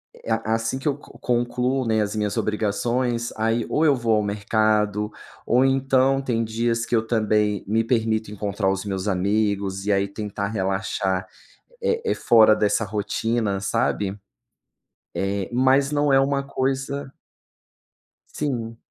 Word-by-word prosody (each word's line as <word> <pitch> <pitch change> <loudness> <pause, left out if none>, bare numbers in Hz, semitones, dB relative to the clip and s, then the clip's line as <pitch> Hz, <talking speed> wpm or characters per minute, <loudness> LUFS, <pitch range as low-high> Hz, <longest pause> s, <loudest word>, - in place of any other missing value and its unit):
É, 115 - -7
a - - +4
a 110 +1 -1
assim 115 +3 -2
que 135 - -4
eu 140 - +1
co - - -16
concluo, 125 +2 0
né, 110 -1 +2
as 105 0 -2
minhas 105 +1 -1
obrigações 115 +3 -1
aí 115 +1 0
ou 160 - +2
eu 145 -3 +5
vou 115 -3 +1
ao 105 - +1
mercado 105 0 0 0.3
ou 125 +2 +3
então 135 0 +2
tem 115 -4 -1
dias 115 +1 -1
que - - 0
eu 110 -1 +1
também 105 -3 +1
me 110 +2 +2
permito 110 -2 0
encontrar 100 -2 -1
os 95 +1 -3
meus 95 0 -3
amigos 100 0 0
e 105 - +1
aí 100 0 +2
tentar 100 0 -4
relaxar, 95 -2 -1 0.5
eh 460 -1 0
eh, 450 - +1
fora 110 -2 +5
dessa 105 +1 +1
rotina 105 0 -1
sabe, 100 0 -1 1.0
eh, 95 0 -2
mas 135 +3 +3
não 145 -1 +2
é 135 - +6
uma 140 0 +1
coisa 135 +1 -2 1.2
Sim. 115 -6 -3
110 Hz, 150 wpm, -23 LUFS, 105-125 Hz, 1.2 s, é